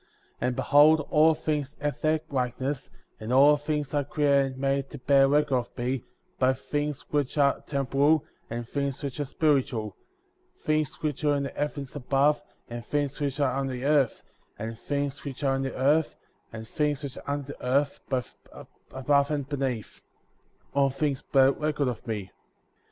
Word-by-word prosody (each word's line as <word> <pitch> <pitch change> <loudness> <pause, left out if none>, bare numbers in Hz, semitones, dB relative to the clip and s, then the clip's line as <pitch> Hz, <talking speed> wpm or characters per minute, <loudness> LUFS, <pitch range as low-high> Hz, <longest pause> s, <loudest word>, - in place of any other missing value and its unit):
« - - -36
63. 125 - 0
And 125 - -1
behold, 150 +3 +5
all 155 +1 +5
things 150 -2 -2
have 145 -2 -3
their 155 0 +2
likeness, 130 +1 -2 0.3
and 110 +2 -5
all 140 +3 +7
things 150 -1 -3
are 145 -1 +2
created 140 -2 +2
and - - -12
made 135 0 0
to - - -8
bear 135 +1 +4
record 145 -1 +3
of 120 - -5
me, 125 +1 -2 0.3
both 130 0 +2
things 145 -1 -2
which 145 -1 0
are 140 -1 +3
temporal, 140 +2 +2 0.2
and 115 0 -4
things 140 +2 -3
which 140 +1 -4
are 145 - 0
spiritual; 130 -7 0 0.7
things 155 -1 0
which 150 -1 -2
are 145 -1 +3
in 140 - -1
the 140 - -3
heavens 145 -2 -4
above, 140 +2 +2 0.3
and 120 0 -6
things 145 +2 -2
which 140 -1 -2
are 135 -3 +2
on 135 0 -1
the 130 0 -4
earth, 145 -4 +2 0.3
and 115 +1 -6
things 145 -1 -3
which 140 0 -6
are 135 -1 +2
in 135 - -1
the 135 -1 -3
earth, 145 +4 +2 0.4
and 110 0 -8
things 150 +1 -1
which 140 -2 -6
are - - -13
under 145 0 -3
the - - -16
earth, 140 +3 +1
both 130 -2 -2 0.6
above 140 +2 +2
and 145 -3 -2
beneath; 130 -6 -3 0.7
all 140 -1 +3
things 140 0 -1
bear 135 -1 +4
record 150 -1 -1
of 125 -1 -4
me/ 110 -2 -2
64. 95 - -19
140 Hz, 185 wpm, -27 LUFS, 130-145 Hz, 0.7 s, all